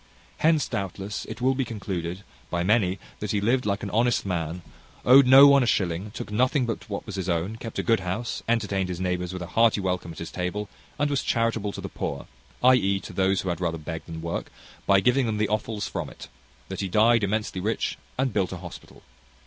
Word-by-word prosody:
Hence, 160 -2 +3
doubtless, 100 +1 -4
it 110 +2 -8
will 130 +1 +3
be 135 0 0
concluded 95 -5 -4 0.3
by 85 0 -1
many 100 -2 +2 0.2
that 105 - -4
he 105 - +1
lived 120 +4 +1
like 100 0 -1
an 100 - -4
honest 120 +3 +2
man, 85 -2 -3 0.4
owed 130 +1 +8
no 135 +2 +10
one 140 -1 +6
a 125 - +1
shilling, 95 -1 0
took 105 - -7
nothing 130 +4 +2
but 115 0 -5
what 100 - -4
was 105 -3 -6
his 95 -1 -3
own, 90 +6 -1
kept 115 0 -7
a - - 0
good 115 -1 +3
house, 95 +6 -3
entertained 100 -5 0
his 90 -1 -4
neighbours 90 -1 -1
with 90 -1 -5
a 90 - -10
hearty 115 -2 +4
welcome 90 -3 -2
at 80 - -11
his 85 - -6
table, 95 +3 -3 0.3
and 145 0 +1
was 140 - +1
charitable 115 -3 0
to - - -6
the - - -5
poor, - - -4 0.4
i.e. 110 -7 +4
to - - -9
those 95 0 +2
who 95 - -3
had 85 0 -3
rather 85 -2 -1
beg 80 +1 -6
than 80 -1 -7
work, 85 - -4 0.4
by 100 -1 +5
giving 125 +3 +3
them 110 -1 -1
the 105 -1 +1
offals 105 0 -2
from - - -4
it; - - -12 0.4
that 95 - -6
he 100 - -1
died 110 +4 +4
immensely 100 -2 -1
rich 110 +4 -2 0.2
and 130 0 0
built 95 - 0
an 95 - -5
hospital. 85 -1 -11
100 Hz, 220 wpm, -26 LUFS, 90-115 Hz, 0.4 s, no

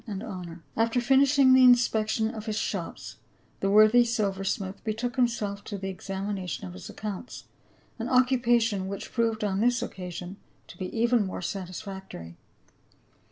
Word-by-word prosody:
357 190 -6 -7
After 230 +2 +1
finishing 270 +1 +5
the 260 0 +7
inspection 225 -3 +4
of 220 0 -8
his 215 -1 -2
shops, - - -4 0.4
the 195 - 0
worthy 215 +4 +6
silver 205 -5 -1
smith 195 0 -3
betook 230 +3 -3
himself 220 -5 0
to 205 - -6
the 195 0 -4
examination 190 - -4
of 90 - -8
his 90 - -10
accounts, 210 +3 -7 0.6
an 230 +2 -3
occupation 240 -6 +2
which 200 0 -6
proved 225 -2 0
on 195 -2 0
this 240 +2 +2
occasion 180 -2 -7 0.3
to - - -13
be 185 - -5
even 235 0 +2
more 185 - -5
satisfactory. 190 - -7
215 Hz, 145 wpm, -27 LUFS, 190-240 Hz, 0.6 s, the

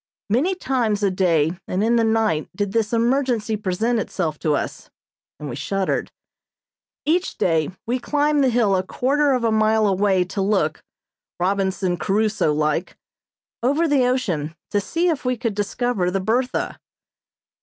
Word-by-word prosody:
Many 310 - +2
times 235 - 0
a 200 - +3
day 175 -2 +1
and 185 +3 -1
in 230 +2 +3
the 230 - +3
night 220 -8 +1
did 205 0 -2
this 220 0 0
emergency 235 -2 +1
present 215 +4 0
itself 165 -7 -3
to 150 -2 +1
us, - - -4 0.5
and 150 - -6
we 120 - -5
shuddered. 195 +7 -2 0.9
Each 345 +5 0
day 160 -3 +1 0.2
we 245 +2 -1
climbed 295 +2 +1
the 265 - +4
hill 230 -5 +2
a 185 - +2
quarter 275 +9 +1
of 250 -2 0
a 225 - +2
mile 220 0 +3
away 195 -1 +2
to 190 +2 -4
look, 190 -6 0 0.6
Robinson 190 -1 0
Crusoe 210 -4 +1
like, 150 +3 -1 0.6
over 285 +7 +2
the 275 -4 +3
ocean 170 - -1 0.2
to 205 - +1
see 335 - 0
if 320 -5 0
we 250 -1 0
could 230 -2 -2
discover 205 -1 -1
the 195 +2 -1
"Bertha." 240 +7 -1
215 Hz, 155 wpm, -22 LUFS, 185-250 Hz, 0.9 s, the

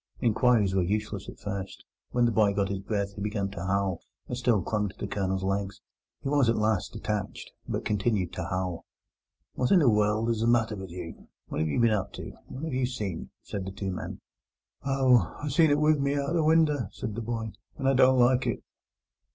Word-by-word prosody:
Inquiries 115 -4 +3
were 95 - +3
useless 105 +1 -2
at - - -10
first. 100 -1 -6 0.2
When 120 0 +2
the 120 - +3
boy 105 -2 +3
got 100 -1 +1
his 100 -1 -2
breath 100 0 -2
he 100 - -8
began 100 -1 -2
to 95 -3 -6
howl, 95 -2 0 0.3
and 125 - -3
still 120 -6 +2
clung 105 0 0
to 95 - -15
the - - -4
Colonel's 95 -1 -1
legs. 100 +1 -2 0.4
He - - -1
was 140 -4 +3
at 115 - +3
last 110 -3 0
detached, 105 -3 -4 0.2
but - - -3
continued 105 -3 0
to 95 - -4
howl. 90 -1 -3 0.7
"What 125 - 0
in 195 - +6
the 155 -6 +4
world 105 +2 +2
is 115 - -1
the 115 - +2
matter 115 -2 +3
with 95 -2 -7
you? 85 -1 -8 0.2
What - - -3
have 80 0 +1
you 75 - 0
been 115 -1 +4
up 105 -3 -1
to? - - -7 0.2
What 130 - -8
have 160 -3 -3
you 130 -1 +1
seen?" 105 -9 -4
said 100 - -4
the - - -4
two 95 -1 -4
men. 90 - -6 0.7
"Ow, 130 -8 +3
I 150 - -3
seen 155 +3 +4
it 145 - +4
wive 150 0 +4
at - - -2
me 140 +1 +1
out 140 -1 -1
of 170 - -1
the 165 - +3
winder," 150 - +3
wailed 110 -4 -2
the - - -2
boy, 115 -1 -3 0.3
"and 135 - -1
I 135 - +5
don't 130 0 +5
like 125 +1 +4
it." - - -2
110 Hz, 225 wpm, -28 LUFS, 95-125 Hz, 0.7 s, in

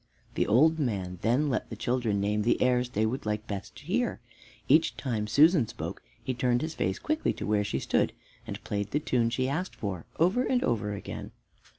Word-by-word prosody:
The - - 0
old 155 +9 +4
man 95 - -2
then 125 +7 +2
let - - -2
the - - -5
children 120 -5 0
name 105 +1 +1
the 115 - +2
airs 125 -1 +2
they 110 -2 +1
would 115 0 -3
like 105 +1 -1
best 100 -3 -6
to - - -13
hear. - - 0 0.5
Each, 155 +4 +4
time 110 -6 -2
Susan 150 - +5
spoke, - - -6 0.2
he 130 - -1
turned 120 +1 +1
his 160 0 -3
face 95 -7 -1
quickly 310 +1 0
to - - -5
where 105 -1 +2
she 100 - -2
stood, - - +1 0.4
and - - -6
played 100 -1 -2
the 150 - 0
tune 120 -5 +1
she 130 +2 0
asked 160 +7 -2
for 95 -6 -4
over 185 +9 +3
and 255 -1 +1
over 105 -3 0
again. 100 - -7
120 Hz, 205 wpm, -29 LUFS, 105-140 Hz, 0.5 s, Susan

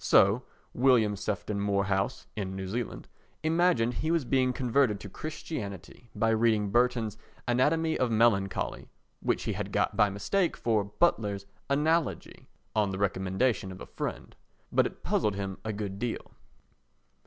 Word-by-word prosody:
So 100 +5 +5 0.3
William 120 -5 +4
Sefton 100 0 -3
Moorhouse 100 +3 0
[in 95 -3 -3
New 95 0 -4
Zealand] 115 +4 -4 0.4
imagined 160 -8 +3
he 155 - -2
was 165 -5 +2
being 130 0 +2
converted 125 -4 +2
to 100 - -7
Christianity 115 - -6
by 115 +2 +2
reading 110 -2 +2
Burton's 120 -2 +1 0.3
Anatomy 155 +7 +2
of 125 - +2
Melancholy, 110 -4 +1 0.3
which - - 0
he - - -1
had - - -4
got - - +1
by 105 - +4
mistake 170 - 0
for 110 -3 +1
Butler's 105 -4 +1 0.2
Analogy, 155 +2 0 0.3
on 105 -2 +2
the 95 - -3
recommendation 95 +2 0
of 95 - -9
a - - -7
friend. - - -5 0.4
But - - +4
it - - -13
puzzled 105 -2 +1
him 95 -1 -4
a 110 - -2
good 100 -2 -4
deal. 120 0 -3
110 Hz, 145 wpm, -29 LUFS, 100-130 Hz, 0.4 s, So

